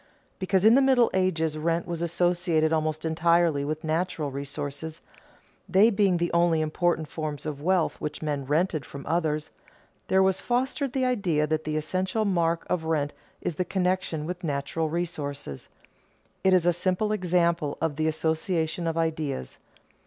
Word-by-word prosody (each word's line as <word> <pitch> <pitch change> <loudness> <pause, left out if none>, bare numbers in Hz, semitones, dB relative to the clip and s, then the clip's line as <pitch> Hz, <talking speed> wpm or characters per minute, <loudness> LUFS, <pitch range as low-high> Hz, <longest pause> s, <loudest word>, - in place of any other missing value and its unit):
Because 190 0 +1
in 220 - +8
the 270 - +6
Middle 260 -3 +4
Ages 160 -5 0
rent 165 +2 0
was 170 -1 -4
associated 170 -2 +1
almost 155 0 -1
entirely 165 -2 +2
with 155 +2 -3
natural 160 -2 -1
resources, 140 +3 -5 0.7
they 205 +5 +5
being 195 -3 +3
the 170 0 -1
only 170 -1 +3
important 155 +1 0
forms 155 -1 -5
of 145 -2 -4
wealth 180 +1 +1
which 150 -1 -4
men 145 -2 -1
rented 155 +1 +1
from 140 +2 -9
others, 155 -2 -1 0.6
there 190 0 +4
was 190 0 +1
fostered 260 +2 -1
the 260 -1 +1
idea 190 -12 +1
that 155 +1 -1
the 155 0 -1
essential 185 +7 -1
mark 170 -4 +1
of 175 -3 -1
rent 150 -3 0 0.3
is - - -2
the 180 - -1
connection 180 -4 -1
with 180 +2 -5
natural 145 +1 -1
resources. 145 - -4 0.7
It 190 - +4
is 175 -2 +3
a 175 - +4
simple 185 +4 0
example 170 -6 +1
of 160 -2 -1
the 155 0 +1
association 160 +1 -1
of 165 0 -1
ideas. 155 - -2
165 Hz, 160 wpm, -26 LUFS, 155-185 Hz, 0.7 s, in